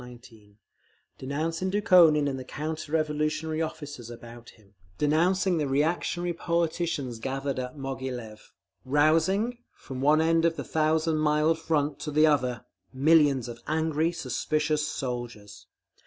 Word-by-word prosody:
19) 115 -4 -15 0.6
denouncing 160 +7 -2
Dukhonin 180 -7 +5
and 135 -2 -3
the - - -6
counter 155 +3 -5
revolutionary 155 0 -1
officers 145 -7 -6
about 120 0 -11
him, 105 -2 -22 0.2
denouncing 175 +4 +2
the 150 - 0
reactionary 170 +5 0
politicians 165 -7 -2
gathered 135 +2 -3
at 125 +3 -6
Moghilev, 130 -5 -6 0.3
rousing, 165 - +2 0.2
from 130 -1 -8
one 150 +3 +4
end 165 +1 +2
of 165 -1 +2
the 140 - -5
thousand 160 0 +1
mile 155 +1 +2
Front 155 -3 -1
to - - -5
the 155 +1 +4
other, 125 -6 +1 0.3
millions 140 -2 +3
of 120 0 -9
angry, 160 +1 0
suspicious 150 0 -1
soldiers. 120 -7 -6
150 Hz, 125 wpm, -27 LUFS, 130-160 Hz, 0.6 s, Dukhonin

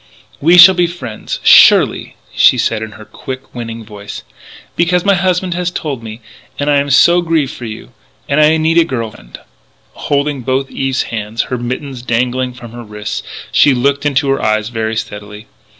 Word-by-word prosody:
"We 170 +5 +4
shall 185 +2 +10
be 175 -1 +1
friends, 130 -11 -7
surely," - - +5 0.2
she - - +4
said 115 -2 -1
in 110 -1 -7
her 110 0 -13
quick, 130 +3 -9
winning 115 -2 -7
voice; 105 -1 -9 0.5
"because 175 +1 +1
my 200 - +4
husband 185 -1 0
has 180 0 -2
told 150 -7 -5
me 110 +1 -9 0.4
and 145 +1 0
I 145 - +3
am 140 0 0
so 170 +6 +5
grieved 160 -5 0
for 120 - -9
you 110 -1 -9 0.4
and 145 +2 +2
I 155 +1 +4
need 160 +1 +2
a - - +5
girl 115 -8 -4
friend - - -14 0.3
" - - -38
Holding 140 -1 0
both 135 +2 -2
Eve's 135 -1 -1
hands, 110 0 -3
her - - 0
mittens 125 +1 -5
dangling 125 +1 -1
from 120 -2 -11
her 120 +1 -9
wrist, 105 -1 -6 0.3
she 140 -3 +4
looked 140 +3 0
into 140 -1 0
her 135 - -1
eyes 110 0 0
very 110 -1 -3
steadily. 105 0 -7
130 Hz, 185 wpm, -14 LUFS, 115-155 Hz, 0.5 s, shall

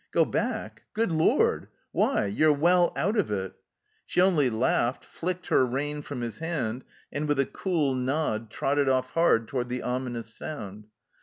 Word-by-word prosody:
" - - -58
Go - - +4
back? - - -3
Good 225 -3 +1
lord! 160 0 +2 0.2
Why? - - +2
You're 150 +10 +3
well 175 +4 +4
out 200 +10 0
of 205 - 0
it 95 -2 -2
I" - - -31 0.5
She - - -1
only 175 -8 +4
laughed, 120 +2 0
flicked 180 +1 -4
her - - +5
rein 145 +4 -2
from 145 -3 -6
his 115 -3 -5
hand, 130 -8 -2 0.3
and 150 +1 -2
with 145 -1 +1
a 140 - +3
cool 160 -7 0
nod 125 -4 -1
trotted 140 +4 +1
off 130 -1 +1
hard 140 -9 +3
toward 125 -2 -2
the 125 0 -3
ominous 125 -2 -3
sound. 105 -8 -7
135 Hz, 175 wpm, -27 LUFS, 120-160 Hz, 0.5 s, her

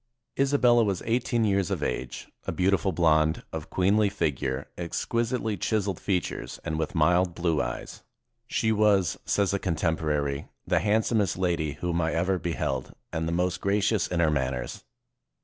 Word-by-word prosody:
Isabella 130 -4 +4
was 100 -5 -1
eighteen 115 0 +1
years 100 -4 +1
of - - -2
age, 65 0 -3 0.2
a - - 0
beautiful 95 0 +1
blonde, 80 -2 +2
of 80 -1 -5
queenly 100 +3 +3
figure, 75 -9 -2
exquisitely 115 +5 -1
chis 105 +2 0
eled 95 -4 -2
features, 95 -3 -2
and 80 -1 -2
with 80 - -3
mild 85 +2 +3
blue 85 -3 +1
eyes. - - -5 0.5
"She 110 -1 +1
was," 105 -4 +3
says 100 -1 +1
a 100 - +1
contemporary, 75 -5 -1 0.2
"the - - +2
handsomest 105 -2 +1
lady 85 -5 0
whom 85 -1 0
I 80 0 0
ever 90 +2 +1
beheld, 85 -2 -3 0.2
and 80 0 -1
the - - -1
most 90 +1 0
gracious 100 0 +1
in 85 -1 0
her 80 -2 +3
manners." 65 -4 -2
90 Hz, 155 wpm, -27 LUFS, 80-105 Hz, 0.5 s, Isabella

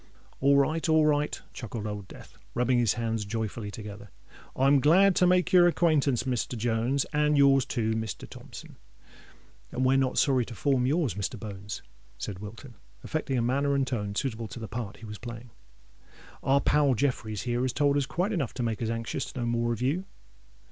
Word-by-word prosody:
"All 140 +1 +4
right—all 160 +2 +3
right!" 150 -1 +1
chuckled 115 -2 -6
Old 105 -2 -5
Death, - - -13 0.2
rubbing 125 0 +2
his 115 -5 +3
hands 115 -2 -1
joyfully 110 0 -4
together. 105 -1 -9 0.5
"I'm 135 +2 +4
glad 180 +7 +5
to 180 - +5
make 180 0 +2
your 175 -1 +7
acquaintance, 155 -8 +2
Mr. 125 -1 -2
Jones—and 135 +6 +1
your's 135 -2 +5
too, 115 -4 -1
Mr. 110 -2 -4
Thompson." - - -11 0.9
"And 130 - -1
we're 130 +1 +4
not 130 -1 0
sorry 130 -3 +3
to 115 - -9
form 125 +2 +1
yours, 150 - +1
Mr. 100 +1 -4
Bones," 100 -2 -7 0.3
said 90 +8 -5
Wilton, 115 +5 -10 0.3
affecting 155 -4 -2
a 120 - +1
manner 140 +3 +1
and 135 -1 +2
tone 105 -6 -3
suitable 115 -2 -2
to 120 - -9
the 110 - -6
part 105 0 -5
he 115 - -11
was 105 -1 -8
playing. 120 0 -8 0.9
"Our 135 +1 +3
pal 145 -3 +3
Jeffreys 110 -5 -1
here 120 0 -1
has 130 0 0
told 145 +2 +2
us 140 -2 +1
quite 180 +6 -1
enough 155 - -2
to 125 - -2
make 115 -1 -2
us 110 - -1
anxious 115 0 -3
to 125 - -5
know - - -1
more 120 0 0
of 115 +1 -3
you." 160 +9 0
125 Hz, 185 wpm, -28 LUFS, 110-140 Hz, 0.9 s, your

